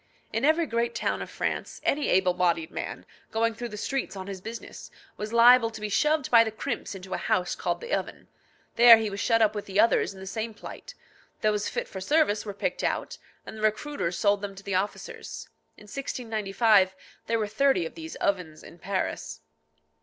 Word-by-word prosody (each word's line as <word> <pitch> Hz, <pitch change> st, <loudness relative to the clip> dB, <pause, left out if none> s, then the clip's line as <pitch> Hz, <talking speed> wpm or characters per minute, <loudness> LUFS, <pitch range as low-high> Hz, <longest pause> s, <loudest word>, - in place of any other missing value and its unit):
In 225 Hz, +3 st, -1 dB
every 315 Hz, +3 st, +4 dB
great 235 Hz, -2 st, -1 dB
town -, -, -1 dB
of -, -, -6 dB
France, -, -, -3 dB
any 290 Hz, +1 st, +1 dB
able 185 Hz, -1 st, +3 dB
bodied 170 Hz, -3 st, 0 dB
man, -, -, -6 dB, 0.2 s
going 230 Hz, +1 st, +1 dB
through 240 Hz, +1 st, -6 dB
the 210 Hz, -, -8 dB
streets 270 Hz, +1 st, -3 dB
on 190 Hz, -1 st, -6 dB
his 195 Hz, -1 st, -7 dB
business, 225 Hz, +3 st, -8 dB, 0.3 s
was 210 Hz, +1 st, -5 dB
liable 235 Hz, 0 st, +7 dB
to 220 Hz, -1 st, -9 dB
be 210 Hz, 0 st, -4 dB
shoved 300 Hz, +6 st, +1 dB
by 230 Hz, -1 st, +8 dB
the 225 Hz, -, -2 dB
crimps 215 Hz, -, -4 dB
into 190 Hz, 0 st, -8 dB
a -, -, 0 dB
house 180 Hz, -1 st, 0 dB
called -, -, -2 dB
the 480 Hz, +1 st, -5 dB
oven. -, -, -3 dB, 0.5 s
There 235 Hz, -1 st, +10 dB
he 220 Hz, -2 st, -2 dB
was 200 Hz, -, -5 dB
shut 230 Hz, 0 st, +3 dB
up 215 Hz, -, +3 dB
with 205 Hz, -2 st, -6 dB
others 230 Hz, -1 st, +4 dB
in -, -, -12 dB
the 190 Hz, -, -8 dB
same 220 Hz, +3 st, -4 dB
plight; -, -, -10 dB, 0.5 s
those 210 Hz, -1 st, +1 dB
fit -, -, -3 dB
for 190 Hz, -, -7 dB
service 220 Hz, -4 st, +2 dB
were 205 Hz, -, -4 dB
picked -, -, -2 dB
out, -, -, -2 dB, 0.3 s
and -, -, -8 dB
the -, -, -8 dB
recruiters 215 Hz, -, -1 dB
sold 205 Hz, -1 st, +2 dB
them 200 Hz, -1 st, -5 dB
to 195 Hz, -, -11 dB
the 200 Hz, -, -4 dB
officers. 190 Hz, +3 st, -4 dB, 0.3 s
In -, -, -15 dB
1695 215 Hz, -4 st, +1 dB, 0.3 s
there 230 Hz, -, +1 dB
were 220 Hz, -, 0 dB
thirty 220 Hz, -3 st, +2 dB
of -, -, -6 dB
these 320 Hz, -1 st, -8 dB
ovens 175 Hz, -6 st, -2 dB
in 170 Hz, -, -13 dB
Paris. 185 Hz, -, -3 dB
215 Hz, 200 wpm, -27 LUFS, 195-235 Hz, 0.5 s, There